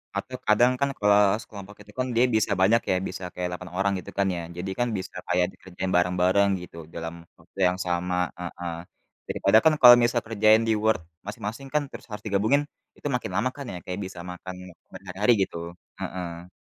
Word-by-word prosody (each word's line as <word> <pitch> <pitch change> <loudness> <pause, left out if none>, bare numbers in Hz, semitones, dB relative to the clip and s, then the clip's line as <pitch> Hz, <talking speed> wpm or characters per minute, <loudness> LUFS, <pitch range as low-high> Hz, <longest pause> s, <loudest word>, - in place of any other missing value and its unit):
atau 130 - -4
kadang 120 +4 +5
kan 140 - +2
kelas 105 0 +4
kelompok 100 0 -10
itu 105 0 -15
kan 130 - +1
dia 120 +2 +5
bisa 110 -1 +2
banyak 115 +5 +5
ya, - - +3
bisa 95 - -7
kayak 90 0 -2
8 90 0 -7
orang 100 +1 +2
gitu - - -10
kan 100 -1 +2
ya. - - -3 0.2
Jadi 90 +2 -4
kan 120 - +2
bisa 95 - -7
kayak 90 0 +3
dikerjain 95 0 -5
bareng-bareng 90 +3 +3
gitu 90 -1 -11 0.2
dalam 80 0 -5 0.3
waktu 85 +3 -17
yang 90 0 0
sama, 90 0 -1 0.2
heeh. 90 -1 -5 0.5
Daripada 100 +3 +3
kan 160 - +6
kalau 120 -1 +11
misal 120 0 +2
kerjain 110 0 +4
di 110 - +3
Word 110 -2 +3 0.3
masing-masing 110 +5 -6
kan 150 - +3
terus - - -10
harus 105 0 -7
digabungin, 105 +8 +2 0.4
itu - - -5
makin 125 - -3
lama 130 - +1
kan 140 -1 -7
ya - - -5
kayak 90 +1 -4
bisa 95 -1 -9
makan 90 +1 -8 0.4
berhari-hari 100 +5 +1
gitu, 90 - -6 0.4
heeh. 85 -1 -5
100 Hz, 190 wpm, -26 LUFS, 90-110 Hz, 0.5 s, kalau